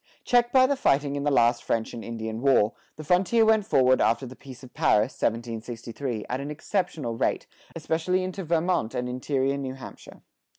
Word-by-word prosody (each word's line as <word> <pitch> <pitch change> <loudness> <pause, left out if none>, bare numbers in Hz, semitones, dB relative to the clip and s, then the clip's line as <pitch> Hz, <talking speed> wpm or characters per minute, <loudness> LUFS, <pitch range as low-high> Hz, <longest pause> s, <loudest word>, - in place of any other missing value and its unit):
Checked 240 -1 +3
by 260 -1 +6
the 280 +2 +1
fighting 145 - +1
in 145 0 -3
the - - +3
last 120 -3 +3
French 115 -1 -2
and 115 - -7
Indian 110 -1 -5
War, 130 -5 +3 0.2
the 155 - -9
frontier 185 +8 +3
went 220 -2 +3
forward 130 0 +4
after 115 +4 +2
the 130 +1 -10
Peace 135 -2 -13
of 125 - -13
Paris 110 +5 +2
(1763) 115 +1 -4
at 125 - -3
an 140 - -5
exceptional 150 - -3
rate, - - -1 0.3
especially 165 +3 -1
into 185 +1 -5
Vermont 165 -7 0
and 125 0 -2
interior 135 +2 -1
New 130 -2 -5
Hampshire. 135 - -12
135 Hz, 180 wpm, -26 LUFS, 120-170 Hz, 0.3 s, by